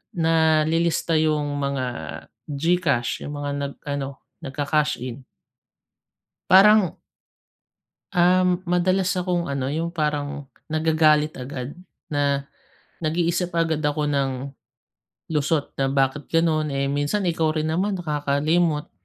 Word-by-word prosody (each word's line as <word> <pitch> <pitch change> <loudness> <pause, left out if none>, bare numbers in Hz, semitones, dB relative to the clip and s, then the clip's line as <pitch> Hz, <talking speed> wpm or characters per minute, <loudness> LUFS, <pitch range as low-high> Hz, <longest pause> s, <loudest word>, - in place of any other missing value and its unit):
nalilista 165 0 +2
yung 150 -2 0
mga 140 -2 -1 0.6
Gcash, 145 -5 0
yung 145 - -5
mga 145 0 -3
nag 140 0 -3
ano, 140 -2 -4 0.2
nagka-cash 150 +1 0
in." 130 +1 -6 1.3
Parang 195 -1 +6 1.1
Uhm, 180 +1 +3
madalas 185 +1 +2
akong 180 -2 -1
ano, 135 -1 -2
yung 165 +2 -1
parang 145 -2 -2 0.2
nagagalit 155 -1 +3
agad, 130 +1 -6 0.4
na 140 -1 +1 0.6
nag-iisip 170 +2 0
agad 160 -2 +1
ako 150 0 0
ng 140 -2 +1 1.0
lusot 150 0 0
na, 135 0 +1
"Bakit 135 +1 0
ganun? 160 -2 +2
Eh, 140 0 0
minsan, 145 +8 0
ikaw 165 -2 +1
rin 155 0 -1
naman 190 +4 0
nakakalimot." 150 0 0
155 Hz, 105 wpm, -23 LUFS, 145-170 Hz, 1.3 s, Parang